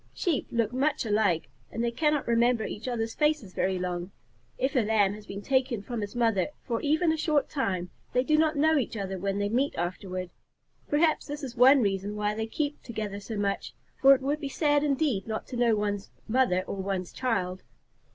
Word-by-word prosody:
Sheep 330 -7 0
look 230 -1 0
much 280 +1 +1
alike, 205 -6 +1 0.2
and 230 - -2
they 235 - +1
cannot 300 +3 +1
remember 235 0 +3
each 220 +4 -6
other's 225 -2 -2
faces 300 -11 0
very 190 0 0
long. 180 0 -3 0.5
If 265 +3 -1
a - - +5
Lamb 210 -3 +2
is 210 0 -11 0.2
taken 260 -1 +1
away 200 - -10
from 240 -3 -3
his 205 +3 -5
mother 225 -5 +2 0.2
for 230 -3 -2
even 315 +3 +2
a 320 - 0
short 300 -2 +1
time, 185 - -2 0.2
they 250 - +2
do 305 +3 +2
not 315 0 +3
know 310 +1 +4
each 235 -3 -3
other 195 -2 -3
when 195 +1 -1
they 205 0 0
meet 255 +7 0
afterward. 180 +1 -4 0.6
Perhaps 310 +2 +2
this 290 0 -6
is 250 -3 -5
one 260 +2 +7
reason 200 +1 -1
why 210 0 0
they 220 +1 -3
keep 290 +5 -3
together 215 -4 -5
so 210 +2 -6
much, 200 -1 -2 0.3
for 275 0 +8
it 265 - -5
would 290 +3 0
be 285 -3 -4
sad 290 0 +2
indeed 275 -8 0
not 220 -1 -3
to 255 - -5
know 240 -2 +3
one's 205 -1 -2 0.2
mother 220 -6 +2
or 195 - -5
one's 190 -2 -3
child. 190 -8 -1
230 Hz, 205 wpm, -28 LUFS, 200-275 Hz, 0.6 s, for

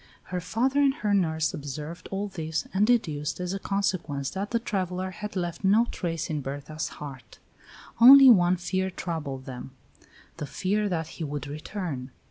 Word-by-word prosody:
Her 180 - -1
father 255 +10 0
and 275 -1 +3
her 210 -1 -1
nurse 160 -5 +1
observed 150 +2 -7
all 195 +1 -2
this 160 -4 -4
and 200 +3 +3
deduced 155 -12 0
as 180 +1 -3
a 195 - -3
consequence 185 -9 -1
that 195 +2 -4
the 235 - +1
traveller 185 -4 -2
had 210 +2 -7
left 175 0 -3
no 210 +5 +5
trace 165 -2 -3
in 155 -3 -2
Berta's 145 +3 -5
heart. 135 -4 -9 0.6
Only 270 +3 +10
one 185 -6 +6
fear 185 +2 -1
troubled 155 -8 -5
them, 130 0 -8 0.6
the 150 - -5
fear 205 +6 -1
that 165 -3 -1
he 165 - -7
would 145 -1 -4
return. 150 -2 -5
180 Hz, 165 wpm, -27 LUFS, 150-200 Hz, 0.6 s, Only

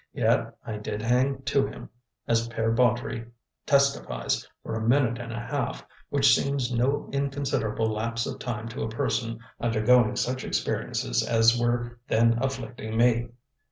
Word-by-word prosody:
Yet - - +1
I 110 - -4
did 105 0 -5
hang 130 +3 +1
to 140 0 +2
him, - - -9 0.4
as 115 0 +2
Pere 115 -1 -1
Baudry 120 0 +1 0.4
testifies, 140 - +1 0.2
for - - -5
a 110 - -2
minute 120 0 +2
and 115 -1 -6
a 115 - -4
half, 125 +2 -3 0.2
which 140 -1 +5
seems 135 -3 0
no 135 +5 +1
inconsiderable 140 -6 -1
lapse 115 +2 -2
of - - -5
time 115 -3 -4
to 115 - -6
a 110 - -2
person 115 +1 -1 0.2
undergoing 115 0 +3
such 130 +1 -1
experiences - - -1
as 115 0 +4
were 120 0 -1
then 115 +1 +3
afflicting 115 -4 -3
me. 120 0 +3
120 Hz, 150 wpm, -27 LUFS, 115-130 Hz, 0.4 s, which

